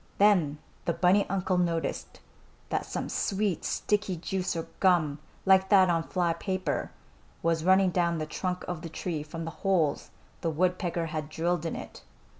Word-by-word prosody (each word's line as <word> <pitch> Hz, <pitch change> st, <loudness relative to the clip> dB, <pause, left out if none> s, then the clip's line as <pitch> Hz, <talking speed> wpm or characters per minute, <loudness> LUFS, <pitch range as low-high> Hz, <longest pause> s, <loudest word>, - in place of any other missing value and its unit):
Then 180 Hz, -8 st, +4 dB, 0.3 s
the 170 Hz, -, +1 dB
bunny 185 Hz, +4 st, +3 dB
uncle 185 Hz, -1 st, 0 dB
noticed 170 Hz, -2 st, -2 dB, 0.5 s
that -, -, -1 dB
some -, -, -3 dB
sweet, 200 Hz, -3 st, -1 dB
sticky 205 Hz, -3 st, 0 dB
juice 185 Hz, +2 st, -2 dB
or 165 Hz, -, -3 dB
gum, 160 Hz, -6 st, +3 dB, 0.3 s
like 190 Hz, 0 st, +5 dB
that 190 Hz, -3 st, +6 dB
on 165 Hz, -1 st, +2 dB
fly 170 Hz, 0 st, 0 dB
paper, 185 Hz, +2 st, -2 dB, 0.5 s
was 165 Hz, -1 st, +1 dB
running 190 Hz, +1 st, +5 dB
down 170 Hz, -1 st, +1 dB
the 155 Hz, -, -2 dB
trunk 180 Hz, +3 st, -3 dB
of 175 Hz, -3 st, -4 dB
the 165 Hz, -, -6 dB
tree 160 Hz, 0 st, -3 dB
from 160 Hz, +2 st, -6 dB
the 165 Hz, -, -4 dB
holes 170 Hz, -7 st, +1 dB, 0.3 s
the 165 Hz, -, 0 dB
woodpecker 175 Hz, +1 st, 0 dB
had 155 Hz, -1 st, -3 dB
drilled 170 Hz, +1 st, -1 dB
in -, -, -3 dB
it. -, -, -8 dB
175 Hz, 165 wpm, -28 LUFS, 165-190 Hz, 0.5 s, that